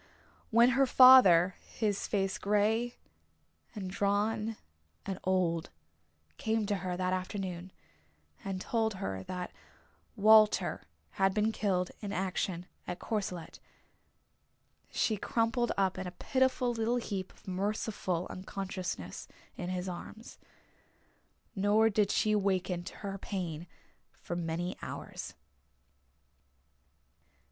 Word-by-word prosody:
When 235 +2 +6
her 265 +2 +3
father, 195 -10 +8
his 210 -3 -2
face 195 -2 -1
grey 215 +4 +1 0.8
and 195 -3 -4
drawn 210 +3 0 0.5
and 195 -2 -4
old, 180 -3 +1 0.7
came 220 -1 0
to 205 -1 0
her 180 -1 -3
that 185 0 0
afternoon 185 -1 -4 0.7
and 195 -1 -3
told 220 +1 0
her 95 - -4
that 180 - -5 0.6
Walter 215 0 +5 0.3
had 195 0 +3
been 215 +1 +2
killed 185 -4 0
in 205 -2 -4
action 185 -2 -2 0.2
at 180 - -3
Courcelette 195 -6 -4 1.3
she 215 - 0
crumpled 230 +3 0
up 190 -1 +1
in 190 - -4
a - - -5
pitiful 260 -1 +1
little 230 +1 0
heap 195 -6 -4
of - - -24
merciful 190 -2 -2
unconsciousness 185 0 -5 0.3
in 180 -2 -5
his 185 0 -3
arms. 200 +5 -8 1.2
Nor 210 +3 +4
did 205 -1 +2
she 215 +1 +2
waken 190 -3 0
to - - -8
her 195 0 -4
pain 175 -5 -4 0.5
for 175 - -5
many 170 +1 -2
hours. - - -7
195 Hz, 110 wpm, -31 LUFS, 185-220 Hz, 1.3 s, father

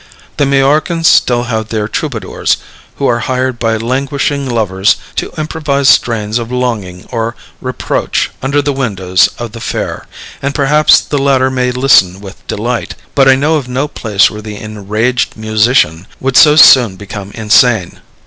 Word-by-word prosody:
The 145 - +1
Majorcans 150 +5 +1
still 120 -6 +3
have 110 -3 -3
their 110 -1 -2
troubadours, - - -2 0.4
who 140 - -3
are 120 -2 +1
hired 130 +1 -2
by 115 -1 0
languishing 135 +3 -2
lovers 100 -5 +1 0.2
to - - -3
improvise 150 -3 0
strains 110 -1 +1
of 115 +1 -6
longing 110 -8 -3
or 115 -1 -3 0.3
reproach 130 -1 -2
under 140 +2 0
the 145 0 -1
windows 95 -9 +1
of 120 -2 -6
the 115 - -9
fair, - - -4 0.3
and 140 +1 -3
perhaps 150 +2 +4
the 145 - -3
latter 135 -1 +2
may 125 -1 0
listen 120 -8 +3
with 100 -1 -13
delight; 120 +3 -3 0.2
but 135 -1 +3
I 135 - +6
know 150 +4 +1
of 135 -4 -5
no 130 +4 -1
place 105 -8 +1
where 105 - -8
the 105 -1 -8
Enraged 110 +4 -2
Musician 110 -6 +1
would 135 0 -2
so 150 +3 +7
soon 125 -8 +6
become 100 0 -8
insane. 110 -3 +2
125 Hz, 160 wpm, -12 LUFS, 110-135 Hz, 0.4 s, so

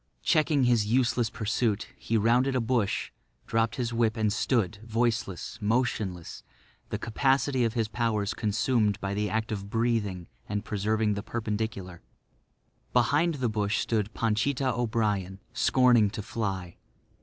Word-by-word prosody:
Checking 155 -3 +3
his 120 -4 +3
useless 120 -1 +2
pursuit, 110 -1 -1
he 115 - -1
rounded 125 +5 +3
a - - +3
bush, 115 -3 0 0.3
dropped 115 0 0
his 120 -2 -2
whip 115 -1 +1
and 110 -2 +1
stood, 110 -4 0
voiceless, 115 -5 -2
motionless, 105 -6 -1 0.5
the - - -2
capacity 135 +3 +1
of 115 +1 -2
his 115 -2 +1
powers 110 -2 -1
consumed 110 -1 +1
by 100 -1 -3
the 105 +1 -1
act 110 +3 -2
of 100 -2 -4
breathing 110 -6 0 0.2
and 105 0 -2
preserving 105 +1 0
the 100 - -3
perpendicular. 105 -5 -4 0.9
Behind 145 +7 +3
the 130 -3 -1
bush 105 -1 0
stood 110 -2 0
Panchita 125 +4 +1
O'Brien, 105 -5 -1
scorning 120 -2 +4
to 105 0 -6
fly. 95 -6 -4
110 Hz, 135 wpm, -28 LUFS, 105-120 Hz, 0.9 s, scorning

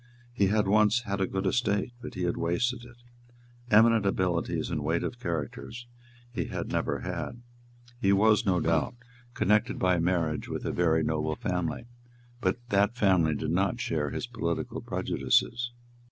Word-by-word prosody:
He 100 -5 +2
had 105 0 +2
once 105 +3 +4
had 100 -3 -2
a 95 - +2
good 95 0 -3
estate; 105 +2 0
but 125 - -8
he 95 - -3
had 85 - 0
wasted 120 +9 -1
it. 120 0 -14 0.7
Eminent 110 0 +6
abilities 90 -3 0
and 75 - -2
weight 80 +3 0
of 120 - -4
character 80 - -4 0.6
he - - -2
had - - -4
never - - -1
had. 120 0 -5 0.6
He 100 -5 +3
was, 105 +1 +4
no 90 -2 +2
doubt, 80 - +1 0.4
connected 105 +2 +2
by 90 -1 +2
marriage 85 -3 0
with - - -4
a - - 0
very 80 -2 +2
noble 80 0 -1
family; 90 +6 -2 0.5
but 130 - 0
that 100 +3 +2
family 90 -8 +3
did - - -2
not - - +1
share 75 -3 -1
his - - -4
political 110 -9 -3
prejudices. 120 0 0
95 Hz, 160 wpm, -28 LUFS, 85-110 Hz, 0.7 s, Eminent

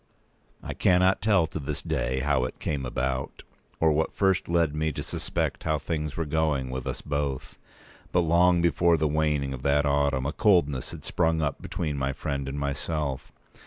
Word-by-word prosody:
I - - -4
cannot 95 +1 +3
tell 100 -6 +3
to 80 - -6
this 70 - -4
day 65 +1 -1
how 70 -2 +1
it - - -6
came 70 -4 -3
about, 65 +2 -3 0.4
or 80 -1 +4
what 75 +2 +1
first 95 -4 +1
led 85 -3 +2
me 80 +1 0
to - - -4
suspect - - -3
how 80 -1 +1
things 75 0 -3
were 80 - -1
going 75 -4 0
with 65 -1 -4
us - - -4
both; 70 -2 -3 0.5
but 90 - +3
long 85 +1 +4
before 85 0 +3
the 75 0 +1
waning 75 -2 0
of 65 - -6
that 70 +1 +2
autumn 70 -2 +1
a 75 - -1
coldness 80 - +2
had - - -9
sprung 80 -2 +1
up 75 -3 -2
between 75 -5 -3
my 65 0 -1
friend 70 -2 -3
and 70 - -5
myself. 70 0 -3
75 Hz, 185 wpm, -27 LUFS, 70-80 Hz, 0.5 s, or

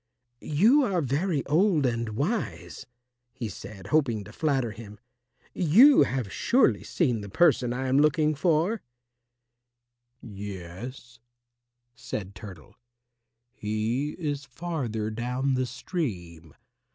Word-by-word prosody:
"You 215 - +4
are 200 -9 +1
very 150 +2 -1
old 160 0 +3
and 115 -2 -1
wise," 195 - -3 0.5
he 130 -3 -5
said, 100 0 -10
hoping 120 -9 +2
to 105 - -13
flatter 135 -7 0
him, 105 -1 -11 0.5
"you 220 - +6
have 125 -7 -1
surely 255 +2 +2
seen 125 - 0
the 100 - -8
person 125 - +3
I 130 +2 -2
am 130 +2 +3
looking 150 +1 +3
for." 170 +7 +1 1.4
"Yes," 105 +4 -9 0.7
said 110 -4 -6
Turtle, 95 -5 -11 0.8
"he 110 +8 -2
is 145 -4 -3
farther 125 -7 -4
down 125 +4 -1
the 130 0 0
stream. 90 - -5
130 Hz, 110 wpm, -27 LUFS, 110-155 Hz, 1.4 s, you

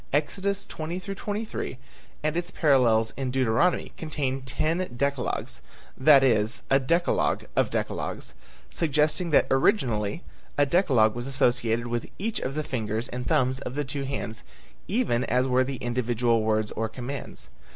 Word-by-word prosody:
Exodus 195 +7 0
20 165 +3 -5
23 205 - -4 0.5
and 155 +1 0
its 175 0 -2
parallels 125 -9 +3
in 135 -2 -2
Deuteronomy 130 +7 +1
contain 140 -4 -2
ten 155 +6 -1 0.2
decalogues, 140 -1 -2 0.3
that 135 0 +6
is 110 -3 +2
a 135 - +6
decalogue 170 +6 +1
of - - +2
decalogues, - - -3 0.4
suggesting 155 +2 +1
that 150 - +5
originally 135 - +1 0.3
a 145 - +5
decalogue 135 - +3
was 120 +2 -5
associated 120 -3 +1
with 120 -1 -3
each 215 +3 -2
of 135 - -4
the 155 - -1
fingers 110 -3 -2
and 125 0 -5
thumbs 130 -4 +2
of 125 -1 -6
the 145 0 -1
two 140 +1 -3
hands 130 -4 -3 0.4
even 195 - +1
as 125 +1 +1
were 130 0 +3
the 135 +1 -4
individual 120 -1 +1
words 110 -1 0
or 110 0 -2
commands. 130 +4 -7
135 Hz, 145 wpm, -26 LUFS, 120-155 Hz, 0.5 s, that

